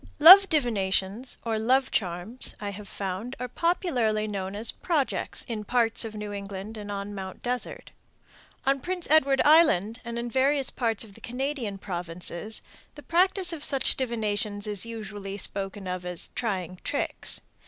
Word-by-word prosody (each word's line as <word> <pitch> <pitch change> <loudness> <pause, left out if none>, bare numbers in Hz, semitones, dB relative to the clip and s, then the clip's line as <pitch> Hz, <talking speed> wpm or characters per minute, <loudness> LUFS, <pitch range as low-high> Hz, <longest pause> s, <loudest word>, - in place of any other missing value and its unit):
Love 375 +6 +10
divinations 220 - 0
or 225 -1 0
love 260 +4 +2
charms, 185 +5 -2
I 205 -1 -4
have 200 +1 -9
found, 200 +7 -5
are 250 - -3
popularly 245 - 0
known 195 -1 -4
as 220 +2 -2
"projects" 310 -6 -1
in 220 -4 -4
parts 230 +1 +2
of 220 -1 -6
New 210 -1 -5
England 200 +1 -6
and 205 -1 -7
on 200 0 -5
Mt. 190 -2 -7
Desert. 250 0 -3 0.7
On 275 +1 +2
Prince 360 +4 -3
Edward 275 -3 +5
Island 250 - +5
and 235 -1 -5
in 235 0 -3
various 270 +1 +3
parts 225 -4 0
of 210 -3 -13
the - - -16
Canadian 250 -4 -3
provinces 180 +2 -2 0.3
the 295 - -11
practice 360 +1 +3
of 305 -3 -4
such 275 -3 +3
divinations 215 -4 -2
is 210 +1 0
usually 210 -3 -6
spoken 195 0 -2
of 180 -1 -4
as 180 -1 -2
"trying 185 -6 -3
tricks." 285 - -1
220 Hz, 155 wpm, -27 LUFS, 200-265 Hz, 0.7 s, Love